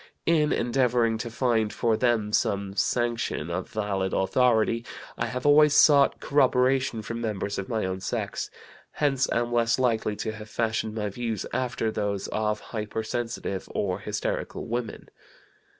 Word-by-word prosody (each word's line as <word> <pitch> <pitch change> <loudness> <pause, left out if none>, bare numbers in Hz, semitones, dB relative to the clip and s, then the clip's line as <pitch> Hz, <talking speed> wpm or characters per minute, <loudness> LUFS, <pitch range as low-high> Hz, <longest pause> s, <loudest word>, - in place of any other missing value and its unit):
In 155 -3 +3
endeavoring 120 -2 +1
to 120 +1 -4
find 115 -3 +1
for 115 -2 +1
them 110 -3 +1
some 100 -1 0
sanction 115 -9 -1
of 90 +2 -3
valid 100 -3 -2
authority, 115 +2 +2 0.3
I - - -2
have 125 +1 -5
always 150 0 +6
sought 140 -2 +6
corroboration 130 -4 +2
from 115 +2 -5
members 100 -3 -2
of 100 - -5
my 110 -3 -1
own 95 0 -3
sex; - - -3 0.4
hence 135 -3 +1
am 120 0 0
less 115 -1 +2
likely 115 -4 +1
to 110 - -3
have 110 0 -10
fashioned 110 -1 -1
my 105 -2 -2
views 115 -1 -3
after 120 -3 -1
those 105 -2 -2
of 105 0 -1
hypersensitive 110 -2 -4
or 95 -1 -1
hysterical 105 +1 -3
women. 120 0 -4
115 Hz, 145 wpm, -26 LUFS, 105-125 Hz, 0.4 s, always